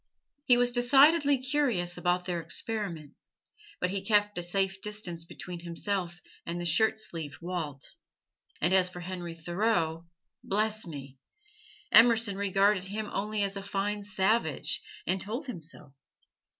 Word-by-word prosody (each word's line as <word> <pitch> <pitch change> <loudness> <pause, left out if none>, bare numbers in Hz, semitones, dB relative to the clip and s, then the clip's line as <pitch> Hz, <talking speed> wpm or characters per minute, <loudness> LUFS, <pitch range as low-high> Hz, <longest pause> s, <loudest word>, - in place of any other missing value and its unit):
He 245 -3 +6
was 245 0 +3
decidedly 280 +4 +5
curious 255 -10 0
about 180 0 0
their 175 -2 -2
experiment. 170 -3 -4 0.7
But 180 - 0
he 195 0 -3
kept 205 0 +2
a - - -2
safe 190 +2 -1
distance 190 -6 -3
between 175 +1 -7
himself 175 +1 -3 0.2
and 170 +1 -4
the 175 - -4
shirt 220 +7 +3
sleeved 165 -9 -5
Walt; 165 -6 -5 0.7
and 175 +4 +2
as 185 -1 +5
for 180 -1 -9
Henry 175 -2 -6
Thoreau 170 -1 -1 0.4
bless 215 0 0
me! 135 -4 -9 0.7
Emerson 230 -3 +6
regarded 195 0 +2
him 210 +2 -5
only 210 +1 -1
as 200 0 -1
a 195 - -4
fine 200 +1 -2
savage, 205 +2 0 0.2
and 190 +1 0
told 235 +9 -4
him 240 -11 -6
so. 150 -3 -9
195 Hz, 140 wpm, -29 LUFS, 175-215 Hz, 0.7 s, He